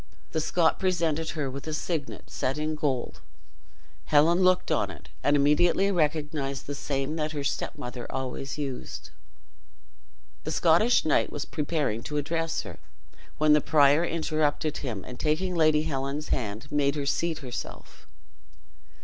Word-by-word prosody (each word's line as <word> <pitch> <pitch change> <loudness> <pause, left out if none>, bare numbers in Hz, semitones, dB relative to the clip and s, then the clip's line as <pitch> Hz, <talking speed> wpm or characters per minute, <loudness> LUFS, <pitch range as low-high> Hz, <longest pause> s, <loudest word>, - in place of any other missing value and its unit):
The 160 - 0
Scot 165 +1 +2
presented 165 -4 0
her 145 -3 -1
with 135 +3 -7
a 155 - -1
signet, 155 -2 -4
set 135 - -1
in 155 +1 -1
gold. 140 -5 -2 0.8
Helen 155 +4 +4
looked 185 0 +3
on - - +1
it, - - -11
and 145 - +4
immediately 170 +7 +3
recognized 150 -4 -1
the 145 - -4
same 140 +1 -2
that 155 0 -2
her 145 -2 -3
stepmother 125 -2 -4
always 130 +1 -4
used. 135 -4 -5 1.3
The - - -4
Scottish 175 +8 +4
knight 155 - +2
was 145 - -4
preparing 145 -7 -1
to 150 +5 -4
address 165 +2 -1
her, - - -10 0.6
when 155 0 +5
the 150 - +5
prior 150 0 +5
interrupted 155 -2 0
him, 110 -9 -4
and 125 -1 -9
taking 165 +4 0
Lady 155 -2 +4
Helen's 140 0 -3
hand, 110 +2 -3
made 140 -1 +2
her 145 -2 -2
seat 165 +3 0
herself. 125 - -8
150 Hz, 145 wpm, -27 LUFS, 140-160 Hz, 1.3 s, when